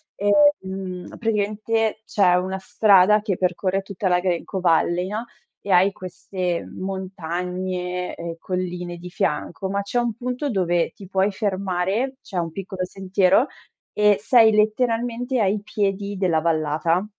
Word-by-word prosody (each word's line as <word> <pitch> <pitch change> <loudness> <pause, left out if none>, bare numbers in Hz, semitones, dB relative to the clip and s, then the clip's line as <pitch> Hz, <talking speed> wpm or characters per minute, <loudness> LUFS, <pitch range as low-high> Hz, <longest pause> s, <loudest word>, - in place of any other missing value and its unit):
Ehm, 195 - +1
praticamente 220 0 0
c'è 190 -5 +3
una 190 +1 -1
strada 210 -2 +5
che 205 -4 -2
percorre 185 +1 0
tutta 195 0 -4
la 180 -1 +3
Glen 180 -2 -1
Coe 190 -2 -4
Valley, 175 +1 +2
no, 215 +4 -4 0.4
e 200 - -2
hai 185 +2 +5
queste 185 -1 -4
montagne 180 -1 -4
e 170 0 -6
colline 180 -1 -4
di 180 +1 -9
fianco, 185 +1 -2
ma 200 +1 -1
c'è 200 +4 -3
un 240 -1 0
punto 250 +5 -3
dove 175 -5 +1
ti 195 - -12
puoi 190 +2 +1
fermare, 195 +5 -1
c'è 190 - -7
un 165 -1 -1
piccolo 190 +1 -5
sentiero 190 +5 +2 0.5
e 210 -1 +4
sei 225 +1 +5
letteralmente 235 +3 +1
ai 205 0 +1
piedi 200 -1 -2
della 175 -4 +1
vallata 165 +3 +1
190 Hz, 140 wpm, -23 LUFS, 180-210 Hz, 0.5 s, strada